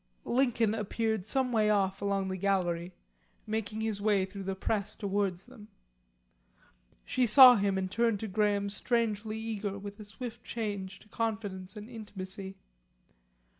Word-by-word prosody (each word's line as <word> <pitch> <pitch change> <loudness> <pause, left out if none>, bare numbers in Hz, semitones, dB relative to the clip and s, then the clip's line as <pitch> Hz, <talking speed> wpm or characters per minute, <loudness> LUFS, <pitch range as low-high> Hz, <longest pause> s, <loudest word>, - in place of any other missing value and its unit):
Lincoln 235 -4 +2
appeared 220 -1 -1
some 260 -1 +1
way 215 -2 +3
off 195 -2 +1
along 200 -1 0
the 190 - -2
gallery, 180 -2 -1 0.5
making 220 0 -3
his 220 -2 -2
way 205 -2 +2
through 195 +1 -9
the 195 0 -2
press 200 +1 -2
towards 195 -3 -1
them. 245 -5 -14 1.4
She 255 -1 +1
saw 255 +2 +10
him 200 -2 +1
and 185 -1 -2
turned 230 -2 +1
to 220 - -3
Graham 205 0 +1
strangely 220 0 -1
eager, 215 -3 -3
with 200 +1 -8
a - - -7
swift 230 +3 -8
change 200 -4 -4
to - - -18
confidence 210 -3 -4
and 210 +1 -8
intimacy. 195 -4 -7
205 Hz, 145 wpm, -30 LUFS, 195-225 Hz, 1.4 s, saw